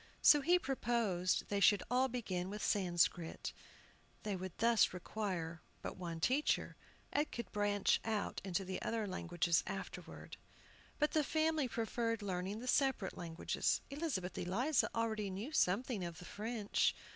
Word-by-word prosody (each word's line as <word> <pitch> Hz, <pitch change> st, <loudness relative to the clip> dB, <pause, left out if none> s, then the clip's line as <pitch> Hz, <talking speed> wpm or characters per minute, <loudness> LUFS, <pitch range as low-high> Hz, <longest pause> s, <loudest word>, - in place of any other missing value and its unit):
So 295 Hz, -, +8 dB
he 350 Hz, +5 st, +5 dB
proposed 230 Hz, -, 0 dB
they 200 Hz, -, +1 dB
should 200 Hz, 0 st, +5 dB
all 255 Hz, +1 st, +4 dB
begin 190 Hz, -8 st, -3 dB
with 210 Hz, +2 st, -5 dB
Sanscrit. 175 Hz, -3 st, +1 dB, 0.7 s
They 210 Hz, -2 st, -1 dB
would 185 Hz, -1 st, -6 dB
thus 230 Hz, -4 st, +4 dB
require 180 Hz, -4 st, -3 dB, 0.2 s
but -, -, -4 dB
one 170 Hz, -3 st, -5 dB
teacher, 265 Hz, -, +1 dB, 0.4 s
and 295 Hz, +1 st, +1 dB
could 235 Hz, -, -5 dB
branch 205 Hz, -1 st, +2 dB
out 220 Hz, -2 st, -2 dB
into 190 Hz, 0 st, -1 dB
the 185 Hz, 0 st, -4 dB
other 225 Hz, -2 st, -1 dB
languages 175 Hz, -3 st, +1 dB
afterward. -, -, -7 dB, 0.6 s
But 300 Hz, 0 st, +2 dB
the 310 Hz, -, +3 dB
family 315 Hz, -1 st, +1 dB
preferred 230 Hz, -1 st, -1 dB
learning 190 Hz, +2 st, -3 dB
the 250 Hz, -, -6 dB
separate 265 Hz, -7 st, +2 dB
languages. 170 Hz, -2 st, -1 dB
Elizabeth 275 Hz, -, -2 dB
Eliza 235 Hz, -, +1 dB
already 220 Hz, -3 st, 0 dB
knew 200 Hz, +10 st, -5 dB
something 220 Hz, -, +1 dB
of 170 Hz, -2 st, -5 dB
the 175 Hz, -, -10 dB
French. 215 Hz, +1 st, 0 dB
205 Hz, 145 wpm, -37 LUFS, 180-245 Hz, 0.7 s, So